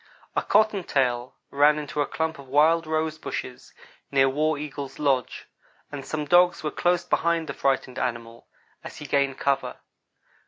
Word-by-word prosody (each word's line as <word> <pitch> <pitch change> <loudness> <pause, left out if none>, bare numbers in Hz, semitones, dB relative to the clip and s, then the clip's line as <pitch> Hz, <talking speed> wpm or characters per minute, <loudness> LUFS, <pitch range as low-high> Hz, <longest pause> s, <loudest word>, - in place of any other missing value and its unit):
A - - +2
cottontail 140 - +1 0.2
ran 145 +2 +4
into 150 0 -3
a 145 - 0
clump 160 -2 -3
of 140 - -12
wild 155 +4 +3
rose 155 0 -1
bushes - - -6 0.4
near 135 -1 +4
War 155 +3 0
Eagle's 145 -2 -6
lodge, 135 -5 -1 0.4
and 145 -2 -6
some 150 +2 -4
dogs 175 +3 +4
were 150 - -2
close 175 0 +1
behind 170 -1 +1
the - - -5
frightened 130 -2 -1
animal, 115 -2 -4 0.4
as - - -9
he 150 - -8
gained 140 -1 +1
cover. 140 -1 -1
145 Hz, 155 wpm, -25 LUFS, 135-160 Hz, 0.4 s, ran